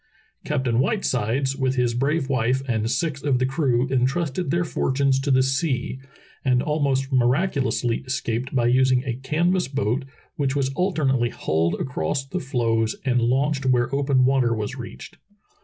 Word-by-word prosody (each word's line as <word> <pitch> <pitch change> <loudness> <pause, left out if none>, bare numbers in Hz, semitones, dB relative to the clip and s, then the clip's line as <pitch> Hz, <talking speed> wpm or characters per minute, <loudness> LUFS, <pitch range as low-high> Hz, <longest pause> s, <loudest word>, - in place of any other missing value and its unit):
Captain 130 -5 0
Whitesides 135 - 0
with 130 -1 0
his 125 -2 +1
brave 140 +4 0
wife 130 0 0
and 110 -2 0
six 150 -1 -1
of 140 -3 +1
the 130 - +1
crew 130 -3 +1
in 130 -1 +2
trusted 165 +2 -2
their 170 +4 +1
fortunes 135 -4 +1
to 140 +1 -3
the 130 -1 +4
sea, 135 -1 -1 0.4
and 125 -2 +2
almost 140 -3 0
miracu 135 +6 +2
lously 120 -3 -1
escaped 125 0 -2
by 120 -2 +2
using 130 +1 +3
a 130 -3 -2
canvas 170 +8 0
boat, 135 -1 -1 0.3
which 140 -2 0
was 135 -2 0
al 185 +5 +1
ternately 130 -7 +1
hauled 80 +2 0
across 130 - -2
the 180 +7 -4
floes 115 -6 0
and 125 -2 +2
launched 135 +3 +1
where 125 0 +2
open 140 -2 +2
water 130 -3 +2
was 110 +3 -4
reached. 120 -3 -9
130 Hz, 165 wpm, -23 LUFS, 125-140 Hz, 0.4 s, the